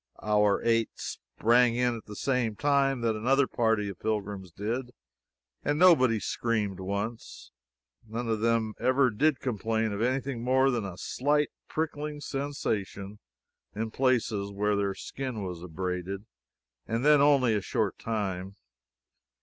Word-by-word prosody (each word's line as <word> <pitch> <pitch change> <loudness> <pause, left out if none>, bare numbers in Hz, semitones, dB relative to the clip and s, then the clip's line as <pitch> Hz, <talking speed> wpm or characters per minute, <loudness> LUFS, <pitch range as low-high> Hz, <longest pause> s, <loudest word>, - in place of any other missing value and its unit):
Our 105 -1 +3
eight 115 -1 +2
sprang 120 +1 +1
in 125 -1 +1
at 110 - -12
the 105 - -9
same 125 -3 0
time 140 -1 +2
that 115 -1 +1
another 135 +6 +3
party 110 -4 +1
of 100 -3 -7
pilgrims 105 -3 -3
did, 120 +7 -4 0.7
and 145 +1 0
nobody 130 -10 +5
screamed 105 -4 -1
once. 100 - -5 0.6
None 115 +2 -4
of 110 -1 0
them 115 -1 +1
ever 130 0 +3
did 145 +7 +2
complain 110 -2 -1
of 100 - -3
any 130 +3 +2
thing 130 -3 -5
more 130 +2 +3
than 115 -5 -1
a 95 -2 -7
slight 145 +7 +1 0.2
pricking 150 -1 -3
sensation 105 -9 -3 0.6
in 110 +1 -3
places 115 -6 +1
where 105 +1 0
their 100 -1 0
skin 130 -6 -5
was 90 -3 -5
abraded, 90 +3 -4 0.6
and 115 +4 -1
then 150 -1 +6
only 140 -4 +5
for 105 - +2
a - - -9
short - - -1
time. 100 -4 -3
115 Hz, 145 wpm, -28 LUFS, 105-130 Hz, 0.7 s, then